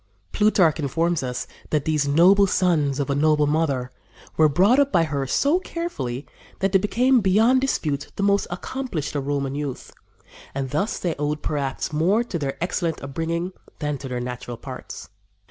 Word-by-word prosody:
Plutarch 185 -7 +3
informs 165 +4 0
us 125 -1 -3 0.2
that 150 -2 0
these 150 -2 +1
noble 185 +7 +5
sons 155 -7 +1
of 140 0 -1
a - - +1
noble 150 0 +3
mother 145 -5 0 0.4
"were 155 -1 +5
brought 195 - +4
up 280 -1 +3
by 170 - +4
her 140 -4 -2
so 290 - +2
carefully 145 - -4 0.3
that 195 0 0
they 195 - +5
became 245 +5 +3
beyond 220 +7 +4
dispute 150 - -1
the 200 - -2
most 200 0 +2
accomplished 180 - -4
of 140 -1 -2
Roman 140 -2 -1
youth; 140 -3 -5 0.6
and, 135 -2 -3
thus, 195 +9 -1
they 175 -3 -1
owed 150 0 -2
perhaps 145 0 -2
more 185 +10 +2
to 190 -8 -4
their 140 -2 -3
excellent 170 -3 -2
upbringing 165 +6 -3 0.2
than 150 -2 -3
to 135 - -7
their 125 -1 -3
natural 125 -1 -6
parts." - - -8
155 Hz, 170 wpm, -23 LUFS, 140-195 Hz, 0.6 s, noble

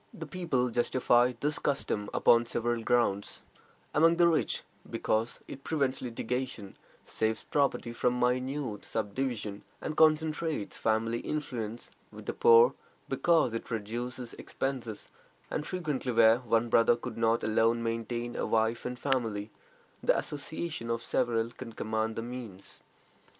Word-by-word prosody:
The 165 - -6
people 145 -7 -1
justify 120 +1 +3
this 150 +1 0
custom 110 -7 -1
upon 115 0 +4
several 120 0 -1
grounds: 115 -4 0 0.5
among 165 +2 +5
the 175 -1 +6
rich, 165 -2 +1 0.3
because 110 +2 -1
it 135 - -9
prevents 140 -4 0
litigation, 125 -3 -4 0.3
saves 110 0 -1
property 140 -4 0
from 125 +1 +1
minute 125 -2 -1
subdivision, 110 -1 -3 0.2
and 155 - -4
concentrates 155 -5 +2
family 115 +1 0
influence; 120 -7 -4 0.2
with - - -11
the - - -2
poor, 465 0 +6 0.4
because 165 -8 +3
it 115 - -5
reduces 120 +2 -4
expenses, 125 -6 -4 0.4
and 150 - -2
frequently 150 -8 -2
where 115 0 +6
one 115 -1 +1
brother 115 0 +5
could 120 -1 -7
not 115 0 +2
alone 115 +2 +2
maintain 120 +1 -3
a - - -1
wife 110 +1 +1
and 125 0 -3
family, 115 -6 -1 0.5
the - - +3
association 150 -3 -4
of 115 0 -1
several 115 -1 0
can 120 -1 -9
command 110 0 -2
the 115 - -3
means. 115 -6 -8
120 Hz, 135 wpm, -30 LUFS, 115-135 Hz, 0.5 s, the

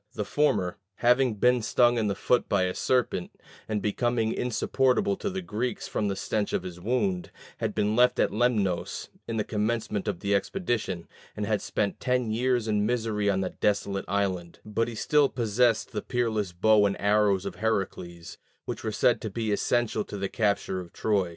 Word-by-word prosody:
The 105 - -3
former, 100 -13 +1 0.2
having 125 +1 +3
been 125 +3 +3
stung 120 +2 +3
in 110 - +1
the 100 - 0
foot 125 - +1
by 100 -2 +2
a 90 0 0
serpent, 125 -8 -1 0.3
and 105 -2 -1
becoming 115 +1 0
insupportable 130 - +1
to 200 - -2
the 190 -1 -4
Greeks 125 -3 -3
from 105 - -1
the 100 - -1
stench 105 0 -2
of - - 0
his 90 -1 -7
wound, 100 -3 -1 0.3
had - - -2
been 105 +1 +1
left 125 +1 +4
at - - +3
Lemnos 105 -6 0 0.2
in 115 - -3
the 105 - +1
commencement 105 -1 -2
of 100 -5 -2
the 100 0 0
expedition, 110 - -1 0.3
and 105 - -1
had 105 -1 0
spent 100 -1 -2
ten 125 -3 0
years 120 0 +1
in 105 -1 +1
misery 110 -2 0
on 95 -1 +1
that 95 - -5
desolate 100 -1 0
island; 95 -3 -1
but 105 +2 0
he 120 - -6
still 145 +4 +3
possessed 115 0 +1
the 105 - -3
peerless 110 -6 -1
bow 105 +4 +4
and 100 - -3
arrows 100 -2 +2
of - - -5
Heracles, 90 -6 -3 0.3
which - - -5
were 110 - -1
said 120 +3 +2
to 110 - -3
be 110 +1 -2
essential 110 +1 +1
to 105 - -7
the 100 0 -2
capture 100 -4 0
of 90 -2 -9
Troy. 100 -5 0
105 Hz, 190 wpm, -27 LUFS, 100-120 Hz, 0.3 s, left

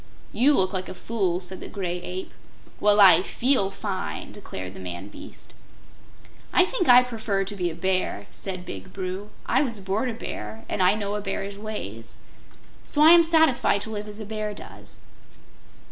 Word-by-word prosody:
"You 275 +5 +4
look 185 -3 +1
like 185 -1 -3
a - - -7
fool," 190 -6 -1
said 185 0 -6
the - - -7
Gray 180 -3 -4
Ape. 185 +1 -6 0.5
"Well, 210 0 +4
I 185 -4 +8
FEEL 235 0 +2
fine!" 195 -1 -5
declared 95 - -8
the - - -10
man 90 +2 -7
beast. - - -12 1.0
"I 360 - +5
think 370 - -1
I 250 0 +9
prefer 220 -5 -2
to 200 +2 -5
be 180 -3 -1
a 160 - -7
Bear," 185 - -1
said 185 -2 -6
Big 95 -1 -8
Bru. 190 +2 -5 0.2
"I 260 - +2
was 235 -7 -2
born 200 +6 -1
a - - -3
Bear, 225 -1 -7
and - - -2
I 185 +3 +5
know 205 -1 -3
a 210 - -2
Bear's 200 0 -4
ways. 115 - -7 0.7
So 295 - +1
I 315 - +9
am 340 0 +8
satisfied 315 -10 +3
to 220 - -5
live 210 -1 -5
as 210 +1 -8
a 215 - -6
Bear 215 0 -4
lives." - - -12
200 Hz, 185 wpm, -25 LUFS, 185-220 Hz, 1.0 s, I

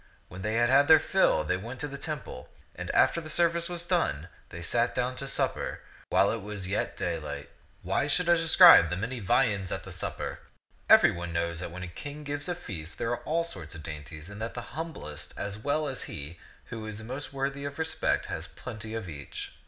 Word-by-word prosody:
When 90 - -8
they 105 +3 -1
had 120 +1 +3
had 140 +2 +6
their 160 -1 +9
fill, 190 - +3
they 90 +4 0
went 115 +7 -7
to 150 - -1
the 140 - -7
temple; 140 - -6 0.3
and - - -6
after 170 - +3
the 155 - -7
service 170 +2 +3
was 175 -1 -4
done, 95 - 0 0.2
they 85 0 -7
sat 120 +7 +1
down 125 0 0
to 135 - -2
supper, - - -1 0.3
while 100 - +4
it 115 - -3
was 100 -2 -5
yet 100 +3 -1
daylight. 85 -4 -4 0.3
Why 95 +11 +1
should 175 +4 +2
I 175 - +7
describe 165 - +8
the 90 - -2
many 115 +6 -3
viands 100 -3 +1
at - - -3
the - - -9
supper? - - -4 0.5
Every - - +8
one 85 0 -5
knows 85 0 -1
that 90 - -4
when 90 +2 -7
a - - -5
king 145 - -8
gives 145 +2 -3
a 175 - 0
feast, 95 - -6
there 115 - -1
are 120 - -2
all 165 +2 +1
sorts 90 - -5
of 80 - -9
dainties, 75 +1 -8
and 105 +2 -9
that 115 - -4
the 120 0 -7
humblest 135 - -6
as 100 +1 -3
well 145 +6 0
as 135 -2 -3
he 75 +3 -7 0.3
who 110 -2 -5
is 110 0 -6
most 130 +6 -4
worthy 140 0 -2
of 140 0 -5
respect 160 0 0
has - - -4
plenty 110 -2 -7
of 110 -4 -4
each. 70 -4 -7
115 Hz, 215 wpm, -29 LUFS, 90-145 Hz, 0.5 s, their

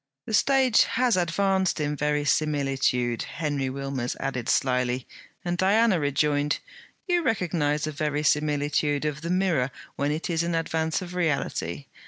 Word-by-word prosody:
'The 220 - -5
stage 260 0 +4
has 250 -1 +1
advanced 190 +1 +1
in 150 0 -1
verisimilitude,' 140 -4 0
Henry 145 -4 -2
Wilmers 135 -2 -3
added 130 -3 -3
slyly; 125 -1 +1 0.4
and 175 0 -2
Diana 200 0 +4
rejoined: 145 0 +1 0.5
'You 355 -2 +2
recognize 165 - 0
a 155 - -3
verisimilitude 150 0 0
of 150 0 -2
the 170 - -4
mirror 180 -8 +1 0.3
when 140 +1 0
it 155 +2 -3
is 165 -2 0
in 170 0 -1
advance 160 +1 -1
of 180 0 -8
reality. 145 - -1
150 Hz, 135 wpm, -26 LUFS, 140-175 Hz, 0.5 s, stage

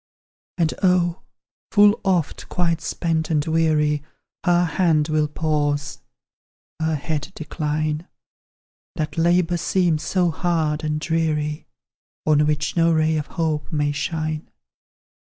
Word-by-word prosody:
And 165 -3 +1
oh! 180 -2 +2 0.5
full 205 0 +5
oft, 180 -6 0
quite 170 -2 0
spent 160 -2 -1
and 150 -2 +1
weary, 155 -2 +2 0.4
Her 175 -1 +3
hand 160 -2 +2
will 155 -1 +2
pause, 150 -1 -1 0.8
her 160 0 0
head 150 +3 -3
decline; 155 +1 -2 0.9
That 155 -2 -3
labour 175 +1 +2
seems 170 -2 +1
so 180 -3 +1
hard 160 -2 0
and 150 0 -1
dreary, 155 -2 -1 0.6
On 150 -1 +4
which 150 -1 -1
no 165 -1 +4
ray 160 0 +2
of 150 -2 -2
hope 160 -3 -2
may 145 -2 +1
shine. 155 +1 -3
160 Hz, 120 wpm, -22 LUFS, 150-170 Hz, 0.9 s, full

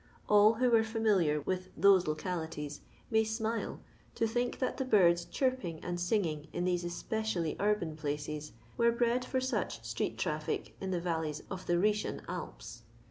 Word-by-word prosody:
All 210 +2 +6
who 245 +1 +2
are 225 - +7
fiimiliar 210 -10 +1
with 185 0 -2
those 190 -1 +6
localities 155 -2 -3 0.3
may 220 0 +4
smile 220 +1 -2 0.3
to 230 - +1
think 240 +2 -1
that 255 - -1
the 265 - 0
birds 175 -8 +4
chirp 260 -1 0
ing 165 -3 -4
and 175 0 -3
singing 175 -5 0
in 175 - -2
these 180 -1 +1
especially 175 -1 -2
urban 205 -6 +1
places, 150 -1 -4 0.2
were 235 0 +4
bred 240 +1 +1
for 260 +1 -1
such 260 +1 -2
street - - -2
traffic - - -2
in 190 - -3
the 180 -2 0
valleys 160 -3 -2
of 185 -1 -6
the 175 - +2
Khsetian 210 +4 +1
Alps - - -7
185 Hz, 165 wpm, -32 LUFS, 160-220 Hz, 0.3 s, are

